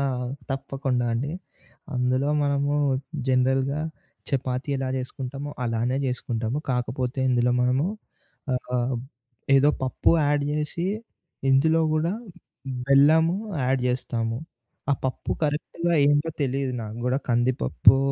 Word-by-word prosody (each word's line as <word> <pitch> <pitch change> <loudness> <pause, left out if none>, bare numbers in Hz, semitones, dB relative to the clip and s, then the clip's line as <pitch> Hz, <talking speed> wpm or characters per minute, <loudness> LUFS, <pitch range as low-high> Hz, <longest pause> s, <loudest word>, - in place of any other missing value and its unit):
ఆ! - - +1 0.5
తప్పకుండా 135 -2 -1
అండి. 135 +7 -1 0.6
అందులో 130 +3 +1
మనము 140 0 +1 0.6
జనరల్‌గా 130 +3 +2 0.5
చపాతీ 130 0 -1
ఎలా 135 -1 -2
చేసుకుంటామో 135 +2 -5
అలానే 120 +3 0
చేసుకుంటాము. 120 0 -2
కాకపోతే 125 +1 -2
ఇందులో 125 0 +3
మనము 130 +5 +2 0.7
ఆహ్, 125 0 -1 0.6
ఏదో 140 +2 +5
పప్పు 130 - +2
యాడ్ 145 0 +2
జేసి, 150 +3 -2 0.6
ఇందులో 160 +5 +4
గూడా 155 +3 +1 0.7
బెల్లము 160 +5 +5 0.3
యాడ్ 130 +1 +1
జేస్తాము. 115 -2 -1 0.5
ఆ - - +5
పప్పు 130 - -2
కరెక్ట్‌గా 160 +3 -1 0.2
ఏందో 145 +3 +2
తెలీదు 135 -1 -1
నాకు 110 0 -7
గూడా 130 +2 +2
కంది 120 +2 +3
పప్పో, 130 - +5
135 Hz, 110 wpm, -25 LUFS, 125-145 Hz, 0.7 s, ఏదో